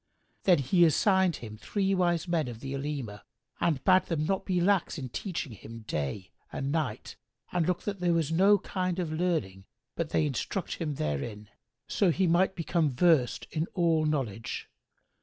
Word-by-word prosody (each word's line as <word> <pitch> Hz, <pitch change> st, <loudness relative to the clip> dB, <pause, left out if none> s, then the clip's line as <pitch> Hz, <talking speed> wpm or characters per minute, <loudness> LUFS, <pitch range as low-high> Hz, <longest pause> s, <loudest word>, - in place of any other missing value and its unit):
Then 180 Hz, -3 st, +6 dB
he 150 Hz, +6 st, +3 dB
assigned 185 Hz, +2 st, +4 dB
him 110 Hz, -2 st, -9 dB
three 195 Hz, -, -1 dB
wise 175 Hz, -2 st, +1 dB
men 165 Hz, -5 st, 0 dB
of 120 Hz, -2 st, -7 dB
the 135 Hz, +2 st, -5 dB
Olema 135 Hz, -7 st, -4 dB, 0.4 s
and 155 Hz, -6 st, +1 dB
bade 185 Hz, 0 st, +5 dB
them 155 Hz, -3 st, -1 dB
not 195 Hz, +3 st, -1 dB
be 185 Hz, -2 st, +1 dB
lax 190 Hz, 0 st, +2 dB
in 130 Hz, -3 st, -5 dB
teaching 170 Hz, -, -4 dB
him 115 Hz, +2 st, -10 dB
day 90 Hz, -1 st, -4 dB, 0.2 s
and 135 Hz, 0 st, -3 dB
night 155 Hz, -4 st, -3 dB, 0.3 s
and 175 Hz, -3 st, +1 dB
look 180 Hz, -1 st, 0 dB
that 205 Hz, -2 st, -3 dB
there 175 Hz, -1 st, +2 dB
was 160 Hz, -2 st, 0 dB
no 195 Hz, +5 st, +5 dB
kind 185 Hz, -2 st, -2 dB
of 175 Hz, -4 st, -2 dB
learning 155 Hz, -, -1 dB, 0.3 s
but 165 Hz, -2 st, -2 dB
they 155 Hz, -, +2 dB
instruct 150 Hz, +6 st, -3 dB
him 155 Hz, -4 st, -3 dB
hterin, 105 Hz, -, -3 dB, 0.4 s
so 195 Hz, -, +2 dB
he 185 Hz, +3 st, +2 dB
might 180 Hz, +3 st, +3 dB
become 165 Hz, -2 st, +1 dB
versed 135 Hz, -2 st, +2 dB
in 160 Hz, +1 st, -1 dB
all 165 Hz, -3 st, +2 dB
knowledge. 120 Hz, -8 st, -3 dB
160 Hz, 175 wpm, -29 LUFS, 130-180 Hz, 0.4 s, Then